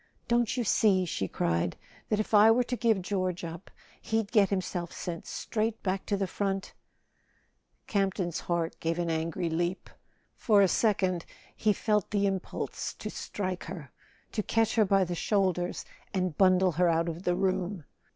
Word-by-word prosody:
"Don't 240 +1 +1
you 245 - +1
see," 195 -3 +3
she 95 - -2
cried, 85 -1 -1 0.3
"that 210 - +1
if 215 - -3
I 210 +1 +8
were 240 +2 +4
to 245 - -3
give 225 -5 +1
George 185 -2 -2
up 170 +2 -7 0.3
he'd 220 -1 -1
get 210 -4 +4
himself 180 -3 -2
sent 170 -2 -6
straight 220 0 -2
back 190 0 -2
to 200 - +1
the 195 - 0
front? 195 0 -2 0.6
" - - -42
Campton's 190 -4 -1
heart 170 -1 -2
gave 165 +1 -1
an 170 -1 -1
angry 165 +2 -1
leap; 175 +3 -2 0.4
for 205 -3 +4
a - - +5
second 185 -3 +1 0.3
he 215 - +2
felt 210 0 0
the 200 -1 +1
impulse 195 -2 -3
to - - -6
strike 185 -3 -4
her, 160 -8 -8 0.4
to 215 - -1
catch 225 +1 +1
her 220 -2 +4
by 195 0 +3
the 180 -1 -3
shoulders 180 -1 0 0.3
and 185 -4 0
bundle 185 0 +4
her 175 +2 +2
out 165 +1 +2
of 170 +1 -4
the 180 -1 +1
room. 185 -1 -1
190 Hz, 170 wpm, -29 LUFS, 175-210 Hz, 0.6 s, I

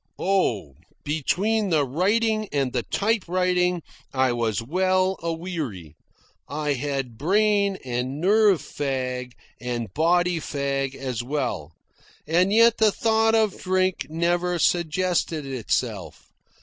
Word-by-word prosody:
Oh, 120 - 0 0.3
between 195 +9 0
the 155 -4 +2
writing 215 - +1
and 135 -3 -1
the 125 - 0
typewriting 180 - 0 0.3
I 130 -2 +2
was 115 -4 -1
well 185 +8 +1
a 165 0 -1
weary. 155 - -5 0.5
I 150 0 -1
had 135 -3 -3
brain 200 +3 +2
and 125 +3 -3
nerve 200 -3 +4
fag, 130 -4 -3 0.3
and 120 -5 -4
body 175 +2 +2
fag 140 -2 -2
as 130 -4 -4
well, 120 - -3 0.5
and 175 +5 +2
yet 230 +2 +5
the 220 -1 +5
thought 225 +1 +2
of 215 -3 +1
drink 185 0 0
never 175 +2 0
suggested 170 -2 0
itself. 130 -5 -3
165 Hz, 115 wpm, -24 LUFS, 135-185 Hz, 0.5 s, yet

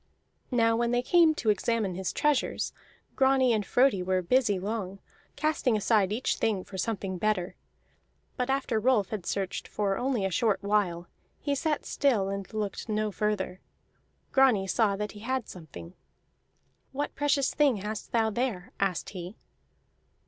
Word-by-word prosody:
Now 230 -3 +3
when 235 +1 +1
they 245 +1 +1
came 330 +1 +5
to 220 -7 +2
examine 215 -2 0
his 190 +1 -3
treasures, 295 -3 0 0.4
Grani 265 -2 +4
and 215 -2 +1
Frodi 245 -3 +3
were 185 0 0
busy 220 0 +2
long, 195 0 -4 0.4
casting 295 -7 +1
aside 210 -2 +2
each 230 +5 -1
thing 205 -4 0
for 195 - -12
something 190 -2 -3
better. 210 -4 0 0.8
But 250 0 -2
after 265 -4 0
Rolf 215 -4 +2
had 205 -5 -5
searched 195 -2 -2
for 200 -2 -1
only 245 -6 0
a 195 - -1
short 200 +1 +1
while, 200 -4 +1 0.3
he 285 - -1
sat 300 +2 -1
still 225 -9 +1
and 195 -1 -5
looked 215 0 -4
no 215 0 0
further. 205 -3 -2 0.7
Grani 255 -8 +4
saw 200 +2 +2
that 210 +1 -4
he 210 - -11
had 255 +2 -2
something. 140 - -10 1.0
"What 290 +2 -3
precious 285 -2 +1
thing 285 -6 +3
hast 210 +2 -5
thou 225 -2 +2
there?" 215 -5 -2
asked 190 -3 -1
he. 185 +1 -7
215 Hz, 155 wpm, -28 LUFS, 195-250 Hz, 1.0 s, came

